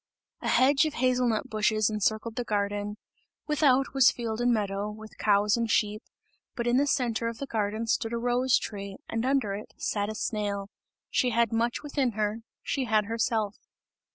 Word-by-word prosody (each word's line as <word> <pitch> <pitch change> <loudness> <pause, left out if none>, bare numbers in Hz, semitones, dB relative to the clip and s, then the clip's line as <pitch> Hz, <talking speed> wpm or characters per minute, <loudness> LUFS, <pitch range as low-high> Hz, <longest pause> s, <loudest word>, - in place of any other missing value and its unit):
A - - -4
hedge 275 +4 +4
of 305 - -5
hazel 250 0 +2
nut 220 -2 -1
bushes 215 0 +2
encircled 220 +1 -1
the 245 - -1
garden; 205 -1 -2 0.5
without 275 -3 +2
was 270 -2 +6
field 230 -1 -3
and 245 0 +3
meadow, 205 -2 -1
with 215 +1 -11
cows 205 0 +3
and 230 -1 -1
sheep; 210 -1 +1 0.5
but 235 - -2
in 240 +1 +3
the 285 +2 +3
centre 235 -4 0
of 230 -1 -4
the 275 - -4
garden 215 -2 -2
stood 225 0 0
a - - 0
rose 245 +2 +2
tree, 200 -2 -6
and 225 0 -2
under 265 -7 +1
it 205 +2 -8
sat 205 -1 -1
a 215 - -5
snail 205 -3 -2 0.4
she 250 - +2
had 235 -1 +1
much 235 +4 0
within 280 -5 0
her, 210 +1 -1 0.2
she 270 -2 -1
had 215 -2 +2
herself. 225 -1 -1
225 Hz, 180 wpm, -28 LUFS, 210-245 Hz, 0.5 s, was